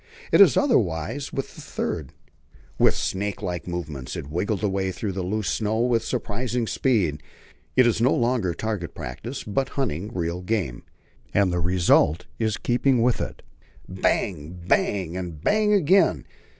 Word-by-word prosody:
It - - +7
is - - +7
otherwise 115 - +1
with 135 - -4
the - - -11
third. - - -4 0.7
With - - +5
snakelike 95 -3 -3
movements 75 -7 -5
it - - -5
wriggles 100 +5 -1
away 95 -2 0
through 100 +2 -3
the 95 0 -3
loose 100 +3 -2
snow 110 +1 0
with 120 -2 +2
surprising 120 0 -2
speed. 100 - +1 0.5
It 130 - +6
is 115 -2 +2
no 125 - +4
longer 115 -8 +1
target 105 -7 -3
practice, 115 - -6
but 130 +6 -1
hunting 105 - -1
real 85 -2 -2
game, 90 - -2 0.5
and 95 -3 +3
the 90 - 0
result 85 -2 +3
is 110 -2 +1
in 105 - -11
keeping 125 0 +2
with 125 -1 +2
it. - - -6 0.4
Bang! 90 -3 -1
bang! 90 -3 +1
and 90 -4 -5
bang 210 - +2
again. 180 - +4
100 Hz, 150 wpm, -24 LUFS, 90-120 Hz, 0.7 s, It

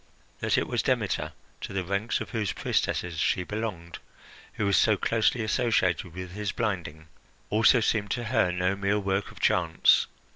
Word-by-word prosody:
That - - +1
it - - 0
was - - 0
Demeter, - - -1 0.3
to - - -6
the 95 -1 -1
ranks 100 +5 -1
of - - -6
whose 110 -4 -1
priestesses 85 -3 -1
she 90 - +1
belonged, 95 -5 -5 0.5
who 105 - -2
was 100 - +2
so 110 -2 +4
closely 115 +3 +1
associated 95 - 0
with 90 -1 -6
his 105 0 -3
blinding, 85 -8 -3 0.4
also 110 +3 +5
seemed 105 -1 0
to 120 - -4
her 105 -5 +1
no 90 +2 0
mere 100 +1 0
work 95 0 -1
of - - -14
chance. 85 -3 +3
100 Hz, 170 wpm, -27 LUFS, 90-110 Hz, 0.5 s, also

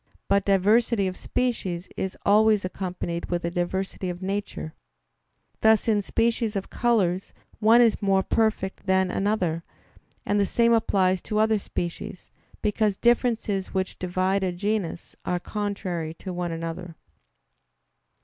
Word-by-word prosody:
But 200 0 +2
diversity 205 +2 +3
of 185 - -4
species 190 -9 -2
is 190 0 -3
always 210 0 +4
accompanied 180 -2 -4
with 175 -1 -2
a 170 - -1
diversity 185 +1 -2
of 175 0 -5
nature; 195 -4 -4 0.9
thus 220 0 +4
in 210 -2 +3
species 230 +1 0
of 195 - -4
colors 195 -6 +1 0.3
one 225 +2 +6
is 230 -2 +3
more 195 -1 +3
perfect 210 -3 0
than 190 -1 +3
another; 185 -5 0 0.6
and 205 0 +1
the 200 - +3
same 235 0 +3
applies 190 -5 +2
to 210 - -3
other 220 0 +3
species, 175 0 -5 0.3
because 210 -1 +1
differences 230 -5 +1
which 190 0 -2
divide 185 +2 0
a 185 - 0
genus 195 -2 -3
are 180 0 -1
contrary 185 -6 -3
to 185 +2 -7
one 175 -1 -3
another. 165 +1 -5
195 Hz, 135 wpm, -25 LUFS, 180-215 Hz, 0.9 s, one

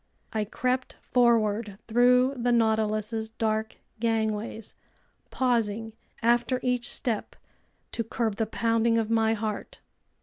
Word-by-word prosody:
I 215 -1 0
crept 255 +4 -2
forward 220 -4 +2
through 250 +3 +4
the 245 -1 0
Nautilus's 220 -1 +1
dark 220 0 -1 0.2
gangways, 220 -1 -1 0.6
pausing 225 -3 0 0.3
after 240 +2 +2
each 250 -1 0
step 225 -4 -2 0.6
to 230 - -2
curb 225 -1 -2
the 225 - 0
pounding 230 +1 +1
of 225 -1 0
my 225 0 +3
heart. 215 -1 -4
225 Hz, 110 wpm, -27 LUFS, 220-240 Hz, 0.6 s, through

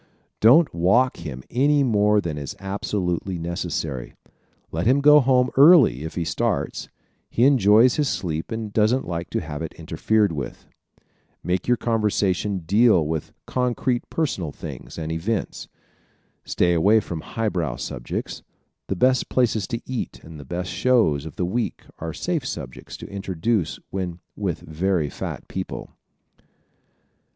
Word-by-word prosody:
Don't 140 +8 +6
walk 100 +10 +3
him 70 -6 -7
any 140 +3 +3
more 105 -3 +3
than 85 -5 -4
is 70 -2 -6
absolutely 95 -2 -2
necessary. 80 -6 -4 0.6
Let 85 +6 -1
him 130 +3 +4
go 150 +1 +7
home 130 -1 +3
early 140 - +7
if 80 - -6
he 85 - -1
starts. 75 - -2 0.4
He 120 - +1
enjoys 120 -2 +5
his 145 -3 +1
sleep 80 -4 -3
and 110 -2 -4
doesn't 110 +5 +2
like 85 0 -4
to - - -2
have 75 -2 -6
it 80 - -5
interfered 90 +6 +1
with. 70 -4 -6 0.3
¶ - - -41 0.4
Make 90 +2 -1
your 125 0 +3
conversation 105 -4 0
deal 100 -3 +4
with 80 -1 -3
concrete 125 0 -1
personal 100 - -2
things - - -9
and 80 -1 -4
events. 95 +6 -3 0.8
Stay 85 0 +2
away 100 +7 +4
from 85 -6 -5
highbrow 90 - -2
subjects. - - -5 0.5
The 95 - -1
best 130 +6 +2
places 115 -5 +1
to 115 0 -4
eat 130 -2 -4
and 80 -2 -11
the 70 - -10
best 90 +5 -4
shows 95 - +2
of 80 - -10
the 90 - -1
week 115 +6 -2 0.2
are 80 0 -4
safe 170 - -2
subjects 70 - -7
to - - -9
introduce 95 0 -1
when 90 -2 -4 0.2
with 95 -6 -3
very 80 -1 -1
fat - - -6
people. - - -6
95 Hz, 145 wpm, -23 LUFS, 80-120 Hz, 0.8 s, go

